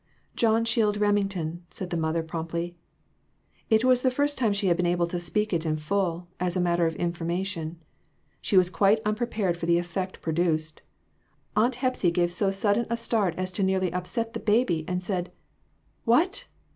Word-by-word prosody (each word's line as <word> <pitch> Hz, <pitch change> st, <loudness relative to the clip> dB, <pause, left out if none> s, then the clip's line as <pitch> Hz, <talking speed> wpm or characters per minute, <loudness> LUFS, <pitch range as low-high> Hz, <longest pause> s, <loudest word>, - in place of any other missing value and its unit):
"John 225 Hz, 0 st, +3 dB
Shield 215 Hz, -3 st, +2 dB
Remington," 195 Hz, -5 st, 0 dB
said 185 Hz, -1 st, -6 dB
the -, -, -1 dB
mother, 165 Hz, 0 st, 0 dB
promptly; 170 Hz, +2 st, -4 dB, 0.9 s
it 220 Hz, 0 st, +4 dB
was 255 Hz, -1 st, +5 dB
the 260 Hz, -, +3 dB
first 285 Hz, +3 st, +1 dB
time 230 Hz, -5 st, +1 dB
she 200 Hz, 0 st, -1 dB
had 175 Hz, -2 st, +4 dB
been 175 Hz, 0 st, 0 dB
able 175 Hz, 0 st, +2 dB
to 175 Hz, +1 st, -3 dB
speak 210 Hz, +5 st, -1 dB
it 165 Hz, -2 st, +1 dB
in 155 Hz, -2 st, 0 dB
full, 175 Hz, +1 st, -1 dB
as 180 Hz, 0 st, +1 dB
a -, -, +1 dB
matter 175 Hz, -1 st, +2 dB
of 160 Hz, -, -3 dB
information. 170 Hz, 0 st, -3 dB, 0.6 s
She 200 Hz, -, +1 dB
was 180 Hz, -1 st, +5 dB
quite 195 Hz, +5 st, +4 dB
unprepared 210 Hz, -4 st, 0 dB
for 170 Hz, -, -4 dB
the 170 Hz, 0 st, +4 dB
effect 185 Hz, +2 st, -3 dB
produced. 160 Hz, -1 st, -1 dB, 0.7 s
Aunt 240 Hz, +3 st, +3 dB
Hepsy 255 Hz, -7 st, +1 dB
gave 175 Hz, 0 st, +1 dB
so 195 Hz, +3 st, +1 dB
sudden 205 Hz, +4 st, +1 dB
a 235 Hz, -, 0 dB
start 215 Hz, -7 st, +1 dB
as 185 Hz, 0 st, -2 dB
to 190 Hz, -, -2 dB
nearly 190 Hz, -2 st, +1 dB
upset 225 Hz, +6 st, -2 dB
the -, -, -3 dB
baby, 210 Hz, -7 st, +2 dB
and 180 Hz, 0 st, -2 dB
said, 180 Hz, -2 st, -2 dB, 0.7 s
"What!" 330 Hz, -, +2 dB
185 Hz, 180 wpm, -26 LUFS, 170-215 Hz, 0.9 s, was